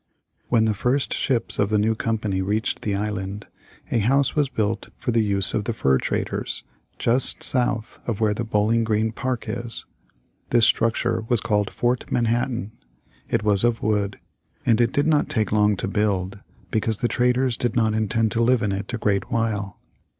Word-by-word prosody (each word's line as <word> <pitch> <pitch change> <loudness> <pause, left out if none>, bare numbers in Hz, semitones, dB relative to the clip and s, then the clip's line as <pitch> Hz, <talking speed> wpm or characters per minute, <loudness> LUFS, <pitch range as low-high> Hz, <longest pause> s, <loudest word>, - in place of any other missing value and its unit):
When 115 -2 +3
the 110 - +1
first 125 +7 0
ships 125 -4 0
of 100 - +2
the 105 - +2
new 110 +2 +2
company 110 -4 -2
reached 105 +4 -1
the 100 -2 -1
island, 100 0 -4 0.5
a 115 - +2
house 135 +5 +2
was 145 -3 +1
built 110 -3 -2
for - - -2
the 115 -1 +2
use 100 -3 +2
of 105 - -1
the 115 - -1
fur 65 -11 +2
traders, - - -3 0.3
just 120 +3 +4
south 120 -3 0
of 115 -4 -2
where 110 -2 +2
the 110 - -3
Bowling 110 +1 +1
Green 110 0 0
Park 125 +1 -3
is. 120 +1 -2 0.6
This 115 -2 +4
structure 115 0 +1
was 120 - +3
called 105 -3 0
Fort 120 0 -1
Manhattan. 120 -1 0 0.6
It - - 0
was 105 -1 +2
of 120 -1 +1
wood, 105 -2 0 0.5
and 115 - +4
did 125 +4 +2
not 150 -2 +2
take 110 -2 0
long 105 -1 +3
to - - -3
build 100 -2 -1 0.3
because 110 0 0
the 120 - 0
traders 125 +1 +1
did 120 0 0
not 110 -2 +2
intend 110 0 0
to 115 - +1
live 120 -1 +3
in 105 - 0
it 100 +4 -4
a 120 - -2
great 105 +1 0
while. 110 -5 -2
110 Hz, 180 wpm, -23 LUFS, 105-120 Hz, 0.6 s, just